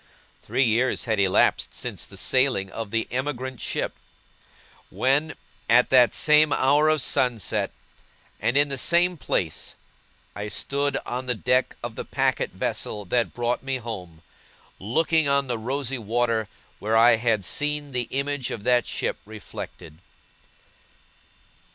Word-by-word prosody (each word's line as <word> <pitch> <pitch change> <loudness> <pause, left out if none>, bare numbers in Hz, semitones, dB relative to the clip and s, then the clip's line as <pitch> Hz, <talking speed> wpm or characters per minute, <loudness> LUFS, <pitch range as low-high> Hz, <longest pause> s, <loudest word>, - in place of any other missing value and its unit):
Three 135 - 0
years 120 +2 +1
had 110 -3 -1
elapsed 95 -2 +2
since - - -5
the - - -10
sailing 130 -8 +2
of 115 0 -5
the 115 +1 -1
emigrant 130 0 -3
ship; - - -2 1.0
when, 145 +4 +1 0.3
at 125 +2 +5
that 125 -2 +6
same 150 0 +5
hour 145 +4 +3
of 155 -3 +2
sunset, 120 -6 0 0.7
and 120 - +1
in 145 0 +4
the 135 -1 0
same 175 +4 +3
place, 90 - -2 0.6
I 105 +1 -5
stood 140 +6 0
on 125 +1 -4
the 125 - +1
deck 125 +3 +1
of - - -4
the - - -6
packet - - 0
vessel 105 -1 -3
that 120 -2 +1
brought 120 0 -1
me 135 -1 -2
home, 90 -9 -8 0.6
looking 160 - +1
on 140 0 +2
the 120 -3 -3
rosy 135 +2 -2
water 115 0 0 0.3
where 110 +2 +1
I 115 0 +6
had 110 -4 0
seen 150 +2 -1
the 125 -2 -2
image 140 -1 -2
of 105 - -6
that 125 0 +2
ship - - -2
reflected. 100 -6 -10
125 Hz, 140 wpm, -24 LUFS, 110-140 Hz, 1.0 s, that